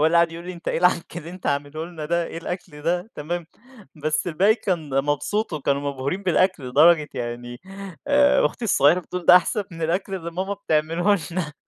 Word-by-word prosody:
هو 155 Hz, -, +5 dB
اللي 170 Hz, +2 st, +3 dB
قعد 170 Hz, -1 st, +4 dB
يقول 170 Hz, +1 st, -8 dB
لي: 185 Hz, -, -5 dB
"أنت 170 Hz, -1 st, -7 dB
إيه -, -, 0 dB
العَكّ 175 Hz, -1 st, +1 dB
اللي 170 Hz, 0 st, -7 dB
أنت 185 Hz, 0 st, -9 dB
عامله 145 Hz, +2 st, -2 dB
لنا 170 Hz, -3 st, -7 dB
ده، 170 Hz, +1 st, 0 dB
إيه -, -, -7 dB
الأكل 165 Hz, -4 st, -7 dB
ده؟" 175 Hz, +5 st, -1 dB
تمام، 170 Hz, +2 st, -4 dB, 0.6 s
بس 155 Hz, +2 st, 0 dB
الباقي 185 Hz, +6 st, +3 dB
كان 175 Hz, -9 st, -3 dB
مبسوط 170 Hz, +9 st, -1 dB
وكانوا 140 Hz, -2 st, 0 dB
مبهورين 140 Hz, +9 st, -3 dB
بالأكل، 185 Hz, -6 st, +1 dB
لدرجة 155 Hz, +3 st, +5 dB
يعني 120 Hz, +1 st, -5 dB, 0.5 s
آآ، 285 Hz, 0 st, +5 dB
أختي 240 Hz, -, -6 dB
الصغيرة 175 Hz, -4 st, +4 dB
بتقول 180 Hz, +1 st, -7 dB
ده 180 Hz, -, +10 dB
أحسن 200 Hz, +3 st, +1 dB
من 165 Hz, -1 st, -8 dB
الأكل 180 Hz, +4 st, -1 dB
اللي 170 Hz, -3 st, -5 dB
ماما 190 Hz, +4 st, -3 dB
بتعمله 175 Hz, +2 st, +1 dB
لنا. 165 Hz, -4 st, -3 dB
170 Hz, 195 wpm, -23 LUFS, 150-185 Hz, 0.6 s, ده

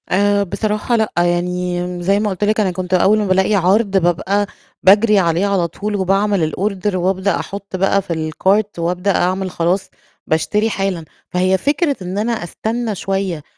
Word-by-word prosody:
آآ 200 Hz, +2 st, +2 dB
بصراحة 215 Hz, +5 st, -1 dB
لأ، 220 Hz, -2 st, 0 dB
يعني 175 Hz, +1 st, 0 dB, 0.2 s
م -, -, -6 dB
زي 195 Hz, +3 st, +2 dB
ما 210 Hz, 0 st, 0 dB
قُلت 190 Hz, +1 st, -3 dB
لك 215 Hz, +1 st, +1 dB
أنا 195 Hz, -3 st, +1 dB
كنت 180 Hz, +1 st, -5 dB
أول 195 Hz, +4 st, +4 dB
ما 210 Hz, -, 0 dB
بالاقي 190 Hz, +2 st, +2 dB
عَرْض 195 Hz, +2 st, +2 dB
بابقى 190 Hz, +3 st, +1 dB, 0.4 s
باجري 205 Hz, +2 st, +5 dB
عليه 170 Hz, +1 st, +1 dB
على 195 Hz, -4 st, +1 dB
طول 205 Hz, +4 st, -4 dB
وباعمل 195 Hz, -3 st, +1 dB
الorder 200 Hz, 0 st, -1 dB
وأبدأ 190 Hz, +2 st, 0 dB
أحُط 200 Hz, -1 st, -7 dB
بقى 195 Hz, +1 st, +2 dB
في 160 Hz, -3 st, -3 dB
الcart 200 Hz, +3 st, 0 dB
وأبدأ 180 Hz, +3 st, 0 dB
أعمل 185 Hz, +1 st, 0 dB
خلاص 175 Hz, +3 st, -1 dB, 0.4 s
باشتري 210 Hz, +7 st, +1 dB
حالًا. 195 Hz, -5 st, -2 dB, 0.2 s
فهي 185 Hz, +1 st, +2 dB
فكرة 285 Hz, -, 0 dB
إن 185 Hz, +2 st, -5 dB
أنا 220 Hz, +3 st, 0 dB
أستنّى 220 Hz, +5 st, -3 dB
شوية 190 Hz, -4 st, -3 dB
195 Hz, 170 wpm, -18 LUFS, 180-205 Hz, 0.4 s, باجري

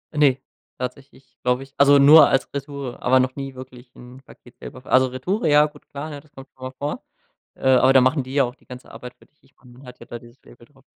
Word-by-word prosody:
Ne, 145 Hz, -3 st, +3 dB, 0.4 s
tatsächlich 135 Hz, +2 st, -9 dB
glaube 125 Hz, +1 st, 0 dB
ich 135 Hz, 0 st, -18 dB
also 140 Hz, 0 st, +5 dB
nur 145 Hz, +2 st, +8 dB
als 135 Hz, -, 0 dB
Retoure, 140 Hz, -2 st, -7 dB
aber 130 Hz, +1 st, +3 dB
noch 130 Hz, 0 st, -1 dB
nie 135 Hz, -1 st, -7 dB
wirklich 125 Hz, -1 st, -13 dB
'n 125 Hz, +2 st, -14 dB
Paket 125 Hz, -2 st, -19 dB
selber 130 Hz, -, -11 dB
ver -, -, -15 dB
also 130 Hz, 0 st, +4 dB
Retoure, 160 Hz, -, -3 dB
ja 150 Hz, 0 st, +5 dB
gut 150 Hz, -, -13 dB
klar, 145 Hz, 0 st, -8 dB
das 150 Hz, +1 st, -27 dB
kommt 135 Hz, -2 st, -13 dB
schon 130 Hz, -, -16 dB
mal 130 Hz, -, -6 dB
vor, 145 Hz, +1 st, -5 dB, 0.5 s
äh, -, -, -3 dB
aber 130 Hz, +1 st, +4 dB
da 135 Hz, -, +6 dB
machen 130 Hz, +3 st, +1 dB
die 130 Hz, +1 st, -9 dB
ja 140 Hz, -1 st, +3 dB
auch 125 Hz, 0 st, -6 dB
die -, -, -30 dB
ganze 125 Hz, 0 st, -12 dB
Arbeit 125 Hz, 0 st, -11 dB
für -, -, -24 dB
dich. 150 Hz, -, -46 dB
Ich 135 Hz, 0 st, -29 dB
meine, 125 Hz, -, -20 dB
man 130 Hz, +2 st, -17 dB
hat 125 Hz, 0 st, -14 dB
ja -, -, -13 dB
da 120 Hz, -, -8 dB
dieses 120 Hz, +2 st, -19 dB
Label 120 Hz, 0 st, -18 dB
drauf. 135 Hz, -1 st, -27 dB
130 Hz, 255 wpm, -21 LUFS, 125-140 Hz, 0.5 s, nur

